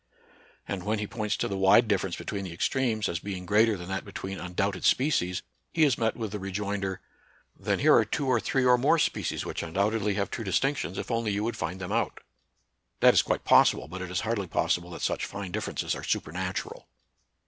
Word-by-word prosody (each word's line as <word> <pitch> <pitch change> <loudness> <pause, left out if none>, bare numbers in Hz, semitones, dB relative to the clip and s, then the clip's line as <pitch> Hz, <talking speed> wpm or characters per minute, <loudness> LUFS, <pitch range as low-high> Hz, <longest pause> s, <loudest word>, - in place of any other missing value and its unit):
And 100 -2 -3
when 105 +4 -1
he 105 - -2
points 105 -1 -2
to - - -1
the 100 - -3
wide 100 +5 +6
difference 95 -3 0
between 100 -2 -5
the 90 - -6
extremes, 110 +4 0
as 85 - -2
being 95 -1 -6
greater 105 +2 +3
than 90 0 -8
that 95 0 -2
between 95 0 -6
undoubted 95 +2 -2
species, 90 - +2 0.3
he 165 - +2
is 140 -5 +4
met 110 -2 0
with 110 -4 -4
the 105 - -4
rejoinder, 95 0 -3 0.3
" - - -35
Then - - -1
here - - +5
are - - +6
two 140 - -2
or 130 -3 +3
three 130 +3 0
or 125 -1 +5
more 140 +6 +4
species 155 - -1
which - - -4
undoubtedly 100 +4 0
have 100 -1 -1
true 115 - -4
distinctions, 110 -1 0
if - - -4
only 115 -1 0
you 105 +1 -1
would 115 0 -2
find 90 -1 -4
them 90 -1 -5
out." - - -1 0.8
That - - +7
is - - +6
quite - - -2
possible, - - +5
but 95 +3 -7
it 90 - -5
is 90 - -1
hardly 110 -3 -2
possible 85 +1 0
that 85 - -7
such - - 0
fine 100 -2 -6
differences - - -2
are - - -5
supernatural. 90 +4 -3
100 Hz, 215 wpm, -28 LUFS, 95-115 Hz, 0.8 s, That